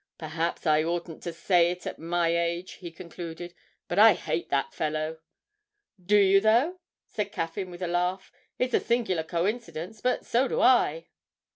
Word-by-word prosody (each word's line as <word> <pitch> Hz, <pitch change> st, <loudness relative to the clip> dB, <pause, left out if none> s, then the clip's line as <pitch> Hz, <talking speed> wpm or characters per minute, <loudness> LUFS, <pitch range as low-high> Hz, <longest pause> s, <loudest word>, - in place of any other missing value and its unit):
'Perhaps 165 Hz, +2 st, -3 dB
I 155 Hz, -1 st, +4 dB
oughtn't 170 Hz, 0 st, -4 dB
to 170 Hz, -, -4 dB
say 170 Hz, +1 st, +3 dB
it 180 Hz, 0 st, -6 dB
at -, -, -5 dB
my 170 Hz, 0 st, 0 dB
age,' 170 Hz, +2 st, -2 dB
he 175 Hz, -, -6 dB
concluded, 170 Hz, +1 st, -8 dB, 0.3 s
'but 175 Hz, -, -1 dB
I 220 Hz, 0 st, +9 dB
hate 165 Hz, -1 st, -3 dB
that 140 Hz, -1 st, 0 dB
fellow!' 155 Hz, +1 st, -2 dB, 0.8 s
'Do 205 Hz, +4 st, +4 dB
you 195 Hz, -1 st, +5 dB
though?' 245 Hz, -, +3 dB, 0.3 s
said 210 Hz, -, -4 dB
Caffyn 165 Hz, +3 st, -4 dB
with 175 Hz, +1 st, -8 dB
a -, -, -1 dB
laugh; 180 Hz, +2 st, -1 dB, 0.3 s
'it's 250 Hz, 0 st, -1 dB
a -, -, +4 dB
singular 230 Hz, -8 st, 0 dB
coincidence, 185 Hz, +3 st, -3 dB
but 250 Hz, -, 0 dB
so 250 Hz, +3 st, +2 dB
do -, -, -2 dB
I.' 165 Hz, -10 st, +3 dB
175 Hz, 165 wpm, -27 LUFS, 165-205 Hz, 0.8 s, I